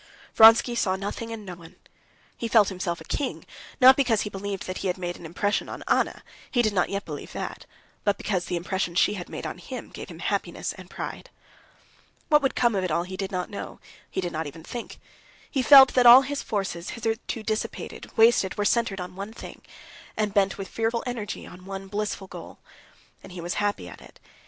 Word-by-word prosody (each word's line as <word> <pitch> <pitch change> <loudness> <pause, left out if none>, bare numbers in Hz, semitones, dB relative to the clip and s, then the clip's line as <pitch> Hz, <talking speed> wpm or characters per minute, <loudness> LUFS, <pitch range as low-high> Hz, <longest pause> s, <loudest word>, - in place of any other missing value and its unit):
Vronsky 225 +2 +7
saw 195 -5 +1
nothing 205 +4 -5
and 220 -2 -7
no 185 - -6
one. 170 -2 -14 0.6
He 235 - -4
felt 215 -2 +5
himself 180 -2 -3
a - - -8
king, 280 -3 -3 0.3
not 260 0 +9
because 245 -6 +2
he 210 - -4
believed 195 0 -5
that 185 - -5
he - - -2
had 180 - -1
made 175 -1 -4
an 165 - -9
impression 205 +5 -1
on - - -7
Anna—he 245 -4 -1
did 215 -2 +1
not 180 -3 +1
yet 200 +1 -3
believe - - -7
that,—but 200 -1 -5
because 185 -4 -2
the 180 - -3
impression 175 0 -2
she 195 - +3
had 180 -4 -7
made - - -6
on - - -5
him - - -8
gave - - -9
him - - -10
happiness - - -2
and - - -13
pride. - - -7 1.0
What 300 -1 +6
would 270 - 0
come 240 -2 +3
of 195 -2 0
it 185 - -1
all 170 +2 +1
he 185 +1 -7
did 195 +1 -4
not 180 0 -3
know, 200 - -7 0.3
he - - -2
did 175 -1 -3
not 160 0 -3
even 160 +2 -10
think. 240 +6 -7 0.5
He 270 - +1
felt 265 0 +9
that 250 -1 +5
all 250 +3 +10
his 285 +1 -3
forces, 190 -5 -3
hitherto 225 0 -3
dissipated, 215 0 -4
wasted, 225 -4 +4
were 205 - 0
centered 215 -3 +1
on 180 0 -7
one 200 +3 -6
thing, - - -10 0.6
and 210 -2 0
bent 195 -2 +2
with 195 -1 -5
fearful 230 +1 -1
energy 240 -4 -5
on 180 +1 -12
one 195 0 -7
blissful 205 -1 -3
goal. - - -10 0.6
And 185 - -12
he 180 - -8
was 175 +1 -3
happy 205 - -1
at 90 - -11
it. - - -16
200 Hz, 210 wpm, -26 LUFS, 185-230 Hz, 1.0 s, all